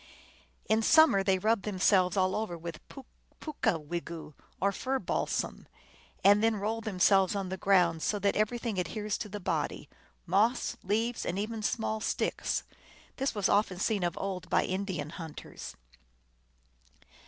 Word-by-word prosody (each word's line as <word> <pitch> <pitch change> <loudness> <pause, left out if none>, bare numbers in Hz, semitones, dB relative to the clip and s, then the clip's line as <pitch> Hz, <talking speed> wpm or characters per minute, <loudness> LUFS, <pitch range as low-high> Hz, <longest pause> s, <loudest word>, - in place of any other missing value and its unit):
In 220 +1 +3
summer 315 -3 +6
time 195 - -1
they 190 -1 +3
rub 215 +3 +1
themselves 190 -1 +2
all 185 0 +2
over 210 -6 -3
with 165 -1 -7
poo 270 -2 -11 0.3
pooka 245 - -1
wigu, 165 0 -6 0.3
or 200 +2 +2
fir 260 +7 -1
balsam, - - -2 0.6
and 205 +2 +6
then 225 0 +3
roll 215 +3 -2
themselves 195 -2 +3
on 195 -2 -2
the 190 - -2
ground, 180 -4 +3
so 210 - 0
that 200 0 +1
everything 220 -1 -1
adheres 210 +4 -2
to 210 - -5
the 205 - -5
body, 185 - -2 0.4
moss, 210 +8 +2
leaves, 225 +5 -1
and 175 - -2
even 215 +2 -3
small 220 +1 -1
sticks. - - -1 0.5
This 270 -3 -1
was 205 - +1
often 200 -3 +2
seen 205 +2 0
of 175 -1 -1
old 190 -3 -4
by - - +3
Indian 185 -6 -3
hunters. 165 -4 -8
200 Hz, 155 wpm, -30 LUFS, 185-220 Hz, 0.6 s, summer